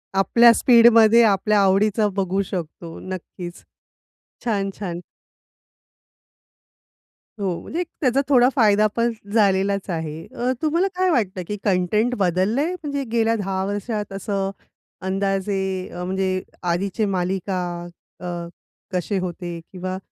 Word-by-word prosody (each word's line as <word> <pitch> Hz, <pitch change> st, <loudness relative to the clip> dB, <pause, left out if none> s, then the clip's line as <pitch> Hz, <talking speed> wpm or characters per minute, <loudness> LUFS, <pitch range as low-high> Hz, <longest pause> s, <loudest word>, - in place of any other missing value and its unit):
आपल्या 235 Hz, +5 st, +6 dB
स्पीडमध्ये 230 Hz, -1 st, +6 dB
आपल्या 210 Hz, 0 st, +3 dB
आवडीचा 205 Hz, +2 st, +3 dB
बघू 195 Hz, 0 st, 0 dB
शकतो. 170 Hz, -3 st, -6 dB
नक्कीच. 180 Hz, -1 st, -8 dB, 0.8 s
छान, 200 Hz, -4 st, 0 dB
छान. 175 Hz, -3 st, -4 dB, 2.4 s
हो. 185 Hz, -4 st, -1 dB
म्हणजे 335 Hz, -, -5 dB
एक 355 Hz, -, -2 dB
त्याचा 265 Hz, 0 st, +3 dB
थोडा 250 Hz, -2 st, +6 dB
फायदा 215 Hz, -3 st, +4 dB
पण 235 Hz, 0 st, +2 dB, 0.2 s
झालेलाच 200 Hz, -2 st, +2 dB
आहे. 160 Hz, -2 st, -4 dB
अ, 250 Hz, +2 st, 0 dB
तुम्हाला 335 Hz, +5 st, +2 dB
काय 370 Hz, 0 st, +2 dB
वाटतं 195 Hz, -, 0 dB
की 210 Hz, -, -3 dB
कंटेंट 210 Hz, +5 st, +1 dB
बदललंय? 200 Hz, -, +1 dB
म्हणजे 285 Hz, -5 st, -4 dB
गेल्या 230 Hz, -1 st, +2 dB
10 190 Hz, -2 st, -2 dB
वर्षात 205 Hz, 0 st, -3 dB
असं? 195 Hz, 0 st, -2 dB, 0.6 s
अंदाजे 190 Hz, -1 st, -1 dB
अ, 180 Hz, -, -5 dB
म्हणजे 185 Hz, 0 st, -1 dB, 0.2 s
आधीचे 190 Hz, +5 st, 0 dB
मालिका 185 Hz, +1 st, -1 dB, 0.6 s
अ, -, -, -9 dB, 0.7 s
कसे 185 Hz, +3 st, -1 dB
होते 175 Hz, -1 st, -5 dB
किंवा 185 Hz, 0 st, -4 dB
195 Hz, 115 wpm, -22 LUFS, 185-230 Hz, 2.4 s, आपल्या